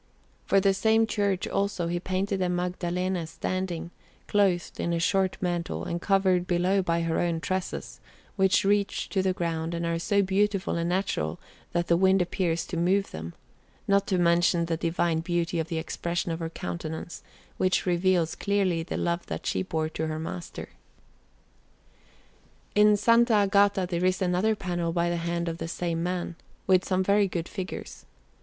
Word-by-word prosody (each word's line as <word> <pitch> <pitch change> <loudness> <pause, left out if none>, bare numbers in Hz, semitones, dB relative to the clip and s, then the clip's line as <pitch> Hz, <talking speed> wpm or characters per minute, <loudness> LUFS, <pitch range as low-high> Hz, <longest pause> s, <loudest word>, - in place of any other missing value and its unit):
For 195 - +4
the 195 0 +3
same 220 +3 +3
church, 200 -4 0
also, 195 -3 -1
he 175 +1 -1
painted 190 +2 -1
a 180 - +1
Magdalene 180 0 -1
standing, 175 0 -3 0.3
clothed 195 -4 +1
in 170 - 0
a 170 - 0
short 190 +2 +1
mantle, 175 -2 -2
and 170 0 -3
covered 190 -2 +2
below 180 +2 +2
this 190 - +1
by 170 -1 +1
her 165 -1 0
own 170 -2 0
tresses, 185 +2 -4 0.4
which 190 -1 +3
reach 200 0 +1
to 195 - +1
the 190 0 +1
ground 170 -2 -2
and 170 0 -2
are 170 0 -1
so 200 +4 +2
beautiful 195 +1 +1
and 170 0 -1
natural, 175 - -1 0.3
that 175 0 +1
the 170 0 +3
wind 190 +1 +4
appears 175 -2 0
to 175 - -5
move 190 +4 +1
them; 80 +2 -7 0.5
not 200 0 +3
to 190 - +1
mention 170 0 +3
the 165 0 -1
divine 165 0 0
beauty 170 0 -1
of 160 - -2
the 165 - -3
expression 170 +2 -2
of 165 - -3
her 165 -1 -3
countenance, 155 - -6 0.4
which 185 0 +1
reveals 175 -2 +2
clearly 195 -4 0
the 165 - -4
love 170 0 -1
that - - -5
she - - 0
bore 160 -4 -1
to 160 0 -3
her 155 0 -3
Master. 90 - -6 2.0
In 210 0 +6
S. 205 - -2
Agata 205 -4 +4
there 175 0 -1
is 185 0 +2
another 185 +4 +1
panel 175 -4 -2
by 170 0 +1
the 175 - -1
hand 170 0 -2
of 165 0 -3
the - - -3
same 170 -1 -2
man, 175 -1 -3 0.3
with 185 -1 +4
some 190 0 +1
very 200 +1 +3
good 170 -2 -3
figures. 190 0 -7
180 Hz, 175 wpm, -27 LUFS, 170-195 Hz, 2.0 s, In